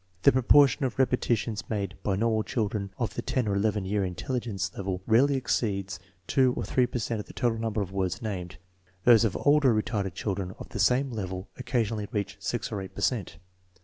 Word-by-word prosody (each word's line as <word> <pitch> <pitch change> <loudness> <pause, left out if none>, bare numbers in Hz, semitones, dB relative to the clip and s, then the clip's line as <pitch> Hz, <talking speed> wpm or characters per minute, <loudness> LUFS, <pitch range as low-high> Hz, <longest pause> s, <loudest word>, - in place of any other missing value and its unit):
The - - +8
proportion 135 +3 +5
of 130 -2 -1
repetitions 120 -4 0
made 100 -3 -2
by 100 - 0
normal 110 +1 +1
children 105 -3 -2
of 115 - -2
the - - -3
10 125 -4 -1
or 100 - +1
11 105 -1 0
year 100 +1 0
intelligence 95 +1 -3
level 95 -2 -3
rarely 130 +5 +4
exceeds 100 -7 -1 0.3
2 130 -2 +3
or - - -1
3 125 -1 +2
per - - -4
cent 115 -1 -2
of 105 - -7
the - - -11
total 115 -2 0
number 110 -2 -1
of 95 - -9
words 95 0 -1
named; 95 -5 -5 0.5
those 120 -2 +7
of 100 - 0
older 145 -4 +4
retarded 100 -4 -1
children 95 -2 -3
of - - -9
the - - -6
same 125 +5 +3
level 95 -3 -5
occasionally 115 -4 -1
reach 100 -2 -3
6 120 - -3
or 100 -3 -3
8 95 - -9
per - - -6
cent. 110 -9 -1
110 Hz, 200 wpm, -28 LUFS, 100-120 Hz, 0.5 s, The